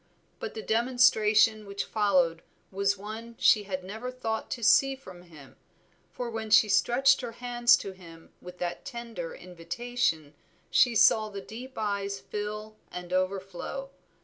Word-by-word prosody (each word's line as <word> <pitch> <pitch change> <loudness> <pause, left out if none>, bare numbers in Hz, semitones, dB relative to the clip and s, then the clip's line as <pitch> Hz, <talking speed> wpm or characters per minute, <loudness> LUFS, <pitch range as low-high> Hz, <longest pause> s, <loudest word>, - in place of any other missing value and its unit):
But - - -6
the 440 - -5
demonstration 220 -3 +3
which 200 0 -3
followed 180 -6 +1 0.3
was 200 +1 0
one 220 +3 -8
she 210 -1 +4
had 185 -2 -4
never 220 +6 -6
thought 225 -3 -4
to 235 - -5
see 270 +4 +5
from 185 -10 -13
him, 155 -6 -16 0.5
for 245 - -5
when 220 -1 -5
she 215 0 +6
stretched 245 +6 +3
her 235 -2 -6
hands 240 0 +3
to 195 - -6
him 165 -3 -15
with 180 0 -11
that 175 -1 -4
tender 230 -8 -7
invitation, 180 - -3 0.4
she 230 +7 +4
saw 215 0 +5
the 200 -1 -7
deep 245 +6 -9
eyes 200 -2 -2
fill 210 +1 -6
and 180 0 -7
overflow. 195 +8 -3
210 Hz, 150 wpm, -28 LUFS, 185-235 Hz, 0.5 s, she